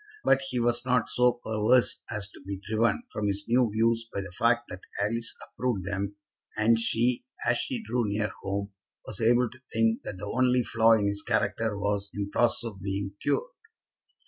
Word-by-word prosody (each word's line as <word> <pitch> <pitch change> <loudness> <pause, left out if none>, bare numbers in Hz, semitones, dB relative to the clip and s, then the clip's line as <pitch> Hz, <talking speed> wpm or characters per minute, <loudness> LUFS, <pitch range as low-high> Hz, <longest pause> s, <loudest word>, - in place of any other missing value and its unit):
But 135 - +4
he 125 - -1
was 120 0 +1
not 125 -2 +1
so 125 0 +4
perverse 120 +1 +2
as 105 -3 -3
to - - -15
be 95 0 -5
driven 115 - +1
from 105 -1 -1
his 100 0 -2
new 120 0 +3
views 115 +1 +1
by 100 - -2
the 100 - -8
fact 115 +5 +2
that 90 - -7 0.2
Alice 115 +3 -1
approved 120 -8 -2
them, 100 0 -3 0.4
and 115 +1 +4
she, 120 +2 +1 0.2
as 120 0 +3
she 245 -4 -3
drew 125 - 0
near 105 0 -1
home, 100 +1 -3 0.3
was 110 +1 -5
able 120 +2 +4
to 130 +1 -16
think 115 0 +2
that 95 - -6
the 100 - -6
only 125 +3 +2
flaw 115 0 +4
in 105 -2 +3
his 100 0 -1
character 110 -1 0
was 100 0 -1
in 100 0 -3
process 120 0 +2
of 100 -4 -9
being 100 0 -3
cured. - - 0
115 Hz, 190 wpm, -28 LUFS, 100-120 Hz, 0.4 s, But